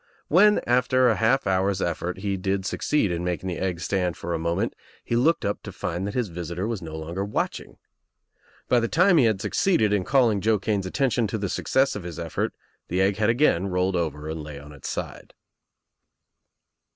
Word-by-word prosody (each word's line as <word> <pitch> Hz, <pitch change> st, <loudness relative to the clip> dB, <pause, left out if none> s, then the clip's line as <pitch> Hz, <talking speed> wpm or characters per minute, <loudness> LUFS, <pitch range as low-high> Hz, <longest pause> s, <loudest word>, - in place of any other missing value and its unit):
When 210 Hz, +6 st, +5 dB
after 125 Hz, +1 st, +3 dB
a 110 Hz, -, +2 dB
half 115 Hz, +7 st, +2 dB
hour's 95 Hz, 0 st, +1 dB
ef 85 Hz, -3 st, -1 dB
fort 90 Hz, +1 st, -4 dB
he 100 Hz, -1 st, -1 dB
did 95 Hz, 0 st, -2 dB
succeed 125 Hz, -3 st, 0 dB
in 85 Hz, 0 st, -2 dB
making 90 Hz, +1 st, -2 dB
the 90 Hz, -, -4 dB
egg 90 Hz, -3 st, -2 dB
stand 90 Hz, -3 st, -1 dB
for 85 Hz, -, -5 dB
a -, -, 0 dB
L -, -, -6 dB
moment 85 Hz, +1 st, -1 dB, 0.3 s
he 120 Hz, -, -2 dB
looked 150 Hz, +8 st, +2 dB
up 100 Hz, -, -2 dB
to -, -, -8 dB
find 90 Hz, +4 st, -3 dB
that 100 Hz, -, -5 dB
his 120 Hz, -5 st, 0 dB
visitor 85 Hz, +3 st, -4 dB
was 115 Hz, -4 st, -3 dB
no 80 Hz, -2 st, -8 dB
60 -, -, -5 dB
THE 80 Hz, -, -5 dB
TRIUMPH 80 Hz, -, -9 dB
OF -, -, -6 dB
THE 95 Hz, -, -1 dB
EGG -, -, -1 dB
longer -, -, -10 dB
watching. -, -, -3 dB, 0.9 s
By 125 Hz, -, +4 dB
the 115 Hz, -, 0 dB
time 180 Hz, +6 st, +4 dB
he 130 Hz, -, +5 dB
had 110 Hz, -4 st, +2 dB
succeeded 110 Hz, -, +2 dB
in 100 Hz, -3 st, +1 dB
calling 115 Hz, -4 st, +3 dB
Joe 110 Hz, +1 st, +3 dB
Kane's 100 Hz, -1 st, -1 dB
attention 120 Hz, +1 st, +1 dB
to 105 Hz, -, -3 dB
the 100 Hz, -2 st, -3 dB
success 135 Hz, +8 st, +1 dB
of 105 Hz, -, -4 dB
his 85 Hz, -2 st, -7 dB
effort 85 Hz, -2 st, -3 dB, 0.3 s
the 90 Hz, -, -1 dB
egg 95 Hz, +1 st, +2 dB
had 105 Hz, 0 st, +2 dB
again 115 Hz, -, +3 dB
rolled 90 Hz, 0 st, 0 dB
over 75 Hz, -3 st, -2 dB
and 80 Hz, 0 st, -4 dB
lay 75 Hz, -1 st, -8 dB
on 70 Hz, +1 st, -11 dB
its 70 Hz, -2 st, -8 dB
side. -, -, -6 dB
95 Hz, 230 wpm, -25 LUFS, 85-115 Hz, 0.9 s, When